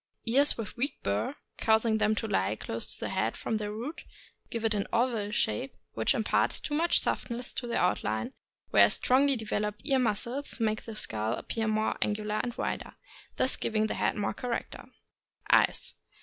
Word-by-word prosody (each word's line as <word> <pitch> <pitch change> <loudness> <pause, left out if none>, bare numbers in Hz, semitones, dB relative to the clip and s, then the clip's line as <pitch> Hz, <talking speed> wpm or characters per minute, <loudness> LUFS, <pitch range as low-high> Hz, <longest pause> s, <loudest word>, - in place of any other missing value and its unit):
Ears 275 +5 +4
with 225 -3 -5
weak 275 +5 -1
burr, 100 - 0 0.2
causing 220 0 +3
them 215 0 +3
to 220 - -2
lie 95 - +1
close 115 +1 -3
to - - -6
the - - -2
head - - -1
from 220 - -1
their 210 -1 -3
roots, 240 +10 -5 0.5
give 230 -1 -3
it 225 - +3
an 200 -1 -1
oval 230 -3 +1
shape, 135 - -1 0.2
which 110 - +2
imparts 220 - +2
too 295 - -5
much 330 +3 +4
softness 240 0 -2
to 245 - -3
the 235 - -1
outline, 110 -11 0 0.4
whereas 100 0 +6
strongly 275 +2 +3
developed 210 -2 -2
ear 270 -3 +3
muscles 245 +5 -1
make 215 -1 0
the 225 - -7
skull 110 - -2
appear 225 -1 -2
more 215 0 +1
angular 210 0 0
and 240 0 -4
wider, - - -3 0.4
thus 260 - +1
giving 215 -1 0
the 215 - -1
head - - 0
more 210 - -1
character. 245 -2 -4 0.7
Eyes. - - +3
220 Hz, 175 wpm, -30 LUFS, 210-240 Hz, 0.7 s, whereas